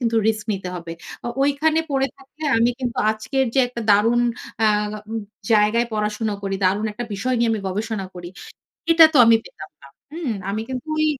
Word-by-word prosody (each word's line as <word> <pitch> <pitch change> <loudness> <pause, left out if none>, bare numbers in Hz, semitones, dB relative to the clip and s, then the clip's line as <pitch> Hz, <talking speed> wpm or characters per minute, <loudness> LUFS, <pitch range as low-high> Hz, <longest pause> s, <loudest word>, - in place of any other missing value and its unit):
কিন্তু 230 -2 0
রিস্ক 215 -1 -1
নিতে 190 -2 -4
হবে। 170 -1 -7 0.3
ও - - -3 0.2
ঐখানে 305 +3 +2
পড়ে 270 -1 +1
থাকলে 275 +3 -16 0.2
আমি 235 +2 +3
কিন্তু 245 -2 -3
আজকের 220 +5 -1
যে - - +2
একটা 235 -1 -6
দারুন 230 +4 +4 0.4
আ - - +5 0.4
উম 225 - -2 0.3
জায়গায় 215 +3 +3
পড়াশোনা 210 0 -1
করি, 195 0 -2
দারুণ 200 +4 +2
একটা 240 +3 -5
বিষয় 255 +6 -1
নিয়ে 235 -1 +2
আমি 220 - -1
গবেষণা 210 0 -3
করি, 175 -1 -8 0.6
এটা 330 0 +8
তো 290 - +4
আমি 230 0 +7
পেতাম 155 0 -11
না, 140 - -14 0.3
হুম? 320 -7 -3 0.2
আমি 210 +2 -2
কিন্তু 260 +3 -5
ওই 310 - +2
225 Hz, 190 wpm, -22 LUFS, 210-260 Hz, 0.6 s, এটা